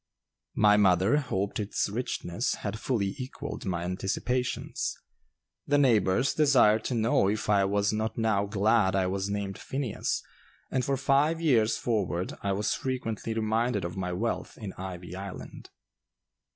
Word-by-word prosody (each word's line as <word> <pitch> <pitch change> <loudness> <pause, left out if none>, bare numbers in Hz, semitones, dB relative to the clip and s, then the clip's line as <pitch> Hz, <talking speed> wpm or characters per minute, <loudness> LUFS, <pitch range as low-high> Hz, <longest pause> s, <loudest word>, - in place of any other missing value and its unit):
My 105 -1 +5
mother 95 +5 +4
hoped 100 -9 -2
its 105 0 -1
richness 105 -2 -2
had 105 +1 -5
fully 105 -7 -1
equalled 135 +2 -6
my 85 -2 -1
anticipations. 100 +7 -2 0.7
The 145 - +3
neighbors 120 -3 +3
desired 125 -8 +4
to 125 - -1
know 110 -3 +3
if 105 0 -1
I 100 -1 +4
was 100 +1 +1
not 110 +1 -2
now 110 -3 +1
glad 105 -1 +2
I 95 -1 +2
was 95 +1 -2
named 100 -1 -3
Phineas, 135 -5 -2 0.5
and 130 - +1
for 135 +2 0
five 140 +4 +2
years 120 -9 +3
forward 95 -6 -1
I 100 - -1
was 100 +2 0
frequently 115 -4 -3
reminded 110 -2 0
of 85 - -5
my 90 -2 -3
wealth 110 +6 -3
in 105 -4 -6
"Ivy 90 -1 -7
Island." 95 0 -8
105 Hz, 145 wpm, -28 LUFS, 95-125 Hz, 0.7 s, My